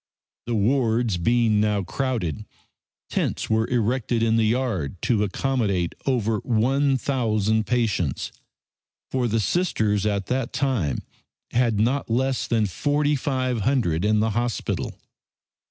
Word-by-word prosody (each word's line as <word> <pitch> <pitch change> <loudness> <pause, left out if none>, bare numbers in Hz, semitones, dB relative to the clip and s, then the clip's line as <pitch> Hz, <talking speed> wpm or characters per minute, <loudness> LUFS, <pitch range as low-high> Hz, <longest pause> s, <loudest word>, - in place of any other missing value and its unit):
The 120 - 0
wards 115 -2 +1
being 115 +3 +2
now 105 -2 +1
crowded, 115 - -2 0.6
tents - - -2
were 110 +1 +2
erected 120 -1 0
in 115 0 +3
the 115 -1 +3
yard 110 - -1
to 115 -4 +2
accommodate 105 -5 0
over 115 -5 +1
one 135 +5 +2
thousand 110 -5 0
patients, 105 - 0 0.8
for 130 -2 +1
the 115 0 +1
Sisters 105 - +1
at 100 -2 -1
that 130 +1 -2
time 115 - 0 0.5
had 115 -3 +2
not 125 +6 +1
less 130 +3 0
than 115 -3 +2
forty 145 - +1
five 130 -3 -1
hundred 100 - +1
in 105 0 +3
the 110 0 +1
hospital. 120 +2 -2
115 Hz, 125 wpm, -24 LUFS, 105-130 Hz, 0.8 s, in